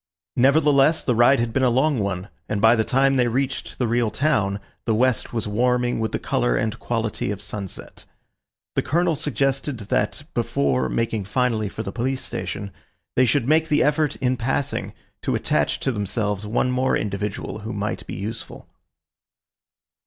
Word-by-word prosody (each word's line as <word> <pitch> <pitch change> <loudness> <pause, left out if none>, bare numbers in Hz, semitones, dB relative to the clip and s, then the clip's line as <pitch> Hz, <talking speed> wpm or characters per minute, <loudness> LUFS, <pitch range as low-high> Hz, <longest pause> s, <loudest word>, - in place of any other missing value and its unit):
Nevertheless, 140 +3 +4
the 125 - +1
ride 120 +3 +5
had 115 -1 -1
been 135 - +1
a 130 - +4
long 130 +2 +2
one, 100 -1 -2 0.2
and 110 - 0
by 115 +2 +6
the 110 - +2
time 135 +3 +3
they 125 -1 +3
reached 130 +3 -2
the 125 - 0
real 120 0 +1
town 105 -7 +1 0.3
the 110 - +2
west 125 0 +1
was 115 -3 -2
warming 125 +3 +1
with 110 0 -1
the - - 0
colour - - 0
and 110 - -1
quality 115 -4 -2
of 100 -1 -3
sunset. 100 -2 -7 0.7
The - - +1
Colonel 170 +2 +1
suggested 135 -2 -1
that, - - 0
before 65 -2 +1
making 115 -3 -1
finally 110 -1 0
for 110 - -5
the 100 - -5
police 130 +3 -2
station, 95 +2 -4 0.4
they 130 - +5
should 130 -1 +2
make 160 +2 +3
the 150 - +3
effort, 150 0 +2
in 130 -1 0
passing, 130 +4 -2 0.3
to - - 0
attach - - 0
to 135 - +1
themselves 105 -1 -2
one 120 +4 +1
more 130 +1 +2
individual 105 +1 -3
who 110 +2 -6
might 105 +1 -3
be - - -5
useful. 110 +4 -6
120 Hz, 170 wpm, -23 LUFS, 105-135 Hz, 0.7 s, by